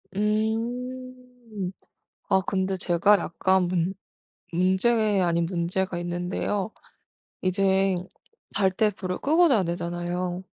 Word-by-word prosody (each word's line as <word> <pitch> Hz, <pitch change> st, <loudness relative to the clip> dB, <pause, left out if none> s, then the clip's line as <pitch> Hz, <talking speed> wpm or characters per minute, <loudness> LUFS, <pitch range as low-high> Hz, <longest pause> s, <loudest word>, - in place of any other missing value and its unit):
음. 235 Hz, 0 st, -3 dB, 0.6 s
아 190 Hz, -, +4 dB
근데 190 Hz, 0 st, -1 dB
제가 180 Hz, +3 st, +4 dB
약간 190 Hz, +2 st, +1 dB
문 180 Hz, +1 st, 0 dB, 0.6 s
문제 185 Hz, +6 st, +2 dB, 0.4 s
아닌 170 Hz, 0 st, +1 dB
문제가 180 Hz, +1 st, -1 dB
있는데요. 180 Hz, +4 st, -2 dB, 0.7 s
이젠 190 Hz, 0 st, +1 dB, 0.5 s
잘 190 Hz, -2 st, +3 dB
때 210 Hz, +2 st, +2 dB
불을 185 Hz, -2 st, -4 dB
끄고 330 Hz, +4 st, +4 dB
자야 225 Hz, -10 st, +3 dB
되잖아요. 175 Hz, +1 st, -3 dB
190 Hz, 195 characters per minute, -26 LUFS, 180-215 Hz, 0.7 s, 아